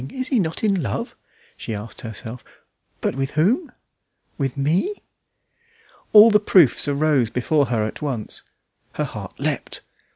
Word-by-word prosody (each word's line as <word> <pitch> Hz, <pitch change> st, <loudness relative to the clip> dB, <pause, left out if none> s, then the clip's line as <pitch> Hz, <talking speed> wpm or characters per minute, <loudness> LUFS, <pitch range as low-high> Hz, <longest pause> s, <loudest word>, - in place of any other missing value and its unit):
Is 260 Hz, -1 st, -4 dB
he 255 Hz, -, +2 dB
not 165 Hz, -1 st, -2 dB
in 200 Hz, -4 st, +2 dB
love?" 115 Hz, -9 st, -4 dB, 0.4 s
she 110 Hz, -, -5 dB
asked 105 Hz, +2 st, -8 dB
herself; 115 Hz, +2 st, -7 dB, 0.6 s
"but -, -, -1 dB
with 135 Hz, 0 st, -2 dB
whom? 235 Hz, -, +2 dB, 0.6 s
With 135 Hz, -2 st, -3 dB
me?" 170 Hz, -, +1 dB, 1.2 s
All 215 Hz, +1 st, +9 dB
the 210 Hz, -, +5 dB
proofs 180 Hz, -, +4 dB
arose 140 Hz, -4 st, +2 dB
before 140 Hz, +4 st, +1 dB
her 115 Hz, -2 st, 0 dB
at 110 Hz, -, -6 dB
once; 130 Hz, -8 st, -4 dB, 0.5 s
her -, -, -2 dB
heart -, -, -8 dB
leapt. -, -, -3 dB
145 Hz, 140 wpm, -22 LUFS, 120-200 Hz, 1.2 s, All